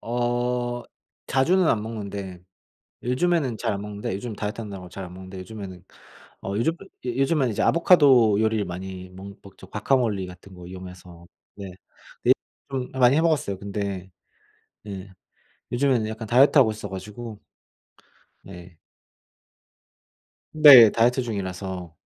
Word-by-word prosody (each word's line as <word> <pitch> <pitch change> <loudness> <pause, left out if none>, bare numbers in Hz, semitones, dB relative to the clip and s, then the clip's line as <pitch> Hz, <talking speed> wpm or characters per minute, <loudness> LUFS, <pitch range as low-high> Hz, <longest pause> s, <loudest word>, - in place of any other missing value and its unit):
어. 120 0 -1 0.4
자주는 175 +8 +2
안 105 - +1
먹는데 100 -5 -6 0.6
요즘에는 130 -1 0
잘 115 -2 -1
안 100 - -4
먹는데 105 -1 -5
요즘 110 +3 -6
다이어트 105 +2 -4
한다고 100 -4 -8
잘 95 +2 -8
안 90 - -11
먹는데 95 +1 -10
요즘에는 95 -2 -9 0.6
어 95 - -4
요즘 140 +9 +1 0.3
요즘엔 135 +2 +1
이제 105 - -2
아보카도 135 - +5
요리를 110 -2 +1
많이 95 +1 -7
멍 95 +2 -10
먹죠. 95 -1 -14
과카몰리 105 -3 0
같은 90 +1 -13
거 90 -1 -11
이용해서 90 -2 -11 0.3
네. 100 -2 -8 1.0
랩을 130 -1 -5
많이 125 +1 +5
해 - - +3
먹었어요. 145 - 0
근데 100 -2 -5 0.7
네 100 -2 -8 0.6
요즘에는 120 -3 +1
약간 110 0 -6
다이어트 130 +7 +5
하고 125 -5 +5
있어 105 -1 -7
가지고 105 +3 -8 1.0
네. 90 -3 -13 1.7
네. 140 -8 +9
다이어트 120 +4 +2
중이라서. 95 -5 -5
105 Hz, 290 characters per minute, -24 LUFS, 95-125 Hz, 1.7 s, 네